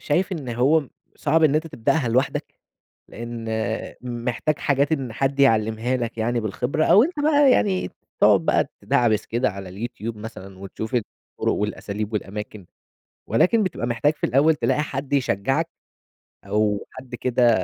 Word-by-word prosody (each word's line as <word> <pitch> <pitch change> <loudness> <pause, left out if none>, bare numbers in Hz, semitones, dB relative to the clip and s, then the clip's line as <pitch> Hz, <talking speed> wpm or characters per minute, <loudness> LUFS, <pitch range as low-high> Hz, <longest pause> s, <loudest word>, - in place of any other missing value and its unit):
شايف 180 +6 0
إن 150 -8 -5
هو 135 +5 +2 0.3
صعب 160 +2 +2
إن 150 -2 +4
أنت 155 +2 +1
تبدأها 150 -2 0
لوحدك، 130 +4 0 0.5
لإن 115 0 -7 0.6
محتاج 125 +4 -2
حاجات 140 +1 +1
إن 135 -7 -1
حد 135 +3 -1
يعلِّمها 115 -1 +2
لك 115 -2 -4
يعني 120 +2 0
بالخبرة 125 +8 -1
أو 210 - +7
أنت 310 +1 -3
بقى 290 -2 +5
يعني 190 - +1 0.3
تقعد - - +6
بقى - - +2
تِدَعبِس 110 -3 +2
كده 120 +3 0
على 95 -2 -8
اليوتيوب 115 +3 -5
مثلًا 100 -3 -9
وتشوف 100 +4 -7
الطُرُق 115 -4 -3
والأساليب 105 +1 -3
والأماكن، 105 -1 -5 0.6
ولكن 185 - +3
بتبقى 185 -10 -2
محتاج 120 +6 +1
في - - -32
الأول 145 +6 +4
تلاقي 150 - +1
حد 135 -1 -5
يشجّعك 135 +4 +1 0.8
أو 105 0 0
حد 130 -1 -9
كده 125 0 +2
125 Hz, 145 wpm, -23 LUFS, 110-145 Hz, 0.8 s, أو